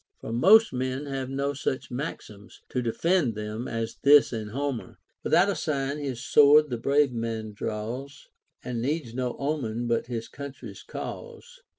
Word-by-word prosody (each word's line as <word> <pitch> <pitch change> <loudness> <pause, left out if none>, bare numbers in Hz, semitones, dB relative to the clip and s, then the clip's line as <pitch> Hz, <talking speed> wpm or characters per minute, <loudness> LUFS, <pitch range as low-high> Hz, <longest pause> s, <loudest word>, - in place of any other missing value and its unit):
For 115 - -6
most 210 - +6
men 130 +2 -2
have 135 -2 -4
no 140 +1 -1
such 130 -2 -3
maxims 120 -6 -7
to 125 - -1
defend 130 - +1
them 105 +3 -4
as 115 -1 -4
this 145 -2 +6
in 110 -2 -4
Homer, 135 +2 -4
— - - -51
Without 180 +3 +4
a 200 - +1
sign 140 -3 -2
his 135 -3 -4
sword 150 0 +6
the 120 - -2
brave 140 +1 +2
man 115 -2 -3
draws, 115 +7 -5 0.4
And 120 -2 -3
needs 135 -2 -2
no 125 -1 -2
omen 125 -6 -2
but 115 0 0
his 115 -2 -4
country's 140 -1 -9
cause. 485 +1 -8
130 Hz, 165 wpm, -27 LUFS, 115-145 Hz, 0.4 s, most